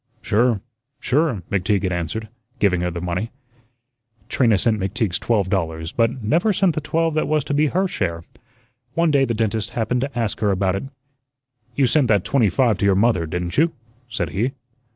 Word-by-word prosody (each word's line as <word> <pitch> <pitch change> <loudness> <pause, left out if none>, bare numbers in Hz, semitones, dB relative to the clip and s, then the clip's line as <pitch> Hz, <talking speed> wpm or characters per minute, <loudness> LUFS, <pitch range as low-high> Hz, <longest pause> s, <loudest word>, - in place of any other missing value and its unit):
"Sure, 110 -1 +2 0.4
sure," 130 - 0
McTeague 100 +1 +1
had 95 - 0
answered, 90 +6 -3 0.3
giving 95 -5 +2
her 90 - 0
the 85 0 -5
money. 90 +5 -2 1.0
Trina 115 -6 +3
sent 110 +2 +1
McTeague's 95 0 -1
twelve 105 -5 +1
dollars, 80 -4 -2
but 115 +3 0
never 165 - +2
sent 190 -3 +2
the 155 - -2
twelve 165 +2 0
that 155 - 0
was 155 -2 +1
to 145 - -3
be 150 +2 +3
her 185 +6 +1
share. 85 - -3 0.7
One 170 -1 +3
day 140 -2 +4
the 115 -2 -2
dentist 110 0 -1
happened 120 +2 0
to 135 -1 -4
ask 115 -3 -1
her 105 - +1
about 95 -1 +1
it. 95 - -4 0.9
"You 140 - +3
sent 135 +1 +3
that 105 -5 +3
twenty 120 -7 +3
five 110 +1 +2
to - - +1
your 100 -1 +4
mother, 100 -5 +2
didn't 90 - -2
you?" 165 +1 +3 0.4
said 115 - -2
he. 120 +7 -1
110 Hz, 190 wpm, -21 LUFS, 95-135 Hz, 1.0 s, day